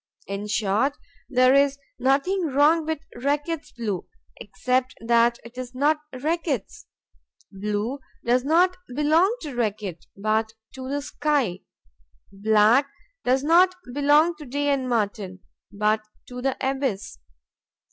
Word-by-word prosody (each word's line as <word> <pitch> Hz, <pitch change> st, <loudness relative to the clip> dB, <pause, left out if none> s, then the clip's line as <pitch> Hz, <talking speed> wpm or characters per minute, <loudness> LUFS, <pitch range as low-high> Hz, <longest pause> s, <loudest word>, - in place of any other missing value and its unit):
In 200 Hz, +1 st, -5 dB
short, 210 Hz, +6 st, +1 dB, 0.3 s
there 255 Hz, -1 st, +5 dB
is 280 Hz, 0 st, +4 dB, 0.2 s
nothing 290 Hz, +8 st, +1 dB
wrong 305 Hz, +3 st, +3 dB
with 320 Hz, -1 st, -3 dB
Reckitt's 290 Hz, +4 st, -2 dB
Blue 210 Hz, -7 st, -4 dB, 0.3 s
except 255 Hz, 0 st, -1 dB
that 235 Hz, +1 st, +3 dB
it 240 Hz, +2 st, -10 dB
is 255 Hz, 0 st, -7 dB
not 300 Hz, +4 st, +2 dB
Reckitt's. 310 Hz, -, -3 dB, 0.6 s
Blue 210 Hz, +6 st, -3 dB, 0.3 s
does 245 Hz, +1 st, +3 dB
not 350 Hz, +5 st, +3 dB, 0.2 s
belong 320 Hz, -, +3 dB
to 295 Hz, -3 st, -6 dB
Reckitt, 205 Hz, -8 st, -3 dB
but 220 Hz, +2 st, 0 dB, 0.2 s
to 260 Hz, 0 st, -7 dB
the 285 Hz, +1 st, -2 dB
sky; 280 Hz, -13 st, 0 dB, 0.7 s
black 220 Hz, +6 st, +4 dB, 0.4 s
does 260 Hz, +2 st, +2 dB
not 355 Hz, +4 st, +5 dB, 0.2 s
belong 295 Hz, +4 st, +4 dB
to 300 Hz, -, -10 dB
Day 285 Hz, +3 st, -1 dB
and 265 Hz, -2 st, 0 dB
Martin, 205 Hz, -5 st, -2 dB, 0.3 s
but 210 Hz, +1 st, +1 dB, 0.3 s
to 250 Hz, 0 st, -7 dB
the 270 Hz, 0 st, -1 dB
abyss. 265 Hz, -, -2 dB
260 Hz, 125 wpm, -24 LUFS, 220-290 Hz, 0.7 s, there